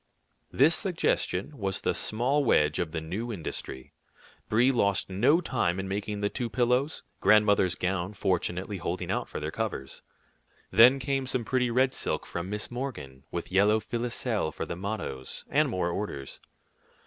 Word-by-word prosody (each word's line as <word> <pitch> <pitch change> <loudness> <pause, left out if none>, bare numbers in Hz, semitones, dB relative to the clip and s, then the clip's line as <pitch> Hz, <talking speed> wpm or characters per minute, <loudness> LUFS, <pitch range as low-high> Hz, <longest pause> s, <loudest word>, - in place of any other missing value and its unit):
This 145 +6 +5
suggestion 155 - 0
was 95 -2 -2
the - - +1
small 130 +7 +1
wedge 75 - +3
of 85 -3 -1
the 80 - -3
new 100 +9 -4
industry. 75 - -6 0.6
Brie 120 +5 +4
lost 100 -6 +1
no 125 - +4
time 105 - 0
in 95 - -3
making 105 +1 -3
the 100 - +2
two 120 0 -3
pillows, 125 +5 +1 0.2
grandmother's 105 -4 +4
gown 90 +1 -2
fortunately 95 +1 -1
holding 85 0 -3
out - - -2
for - - -5
their - - -4
covers. 65 0 -4 0.7
Then 125 +4 +7
came 135 0 -1
some 125 -2 -1
pretty 125 +1 +1
red 130 +2 +2
silk - - -2
from 85 +2 -5
Miss 105 +2 -4
Morgan, 75 - -6
with 85 +1 -5
yellow 105 +3 +4
filoselle 115 -5 -2
for - - -5
the - - -5
mottoes, 95 -9 -5
and - - +3
more 90 -1 -1
orders. 85 -8 -5
105 Hz, 160 wpm, -28 LUFS, 90-125 Hz, 0.7 s, Then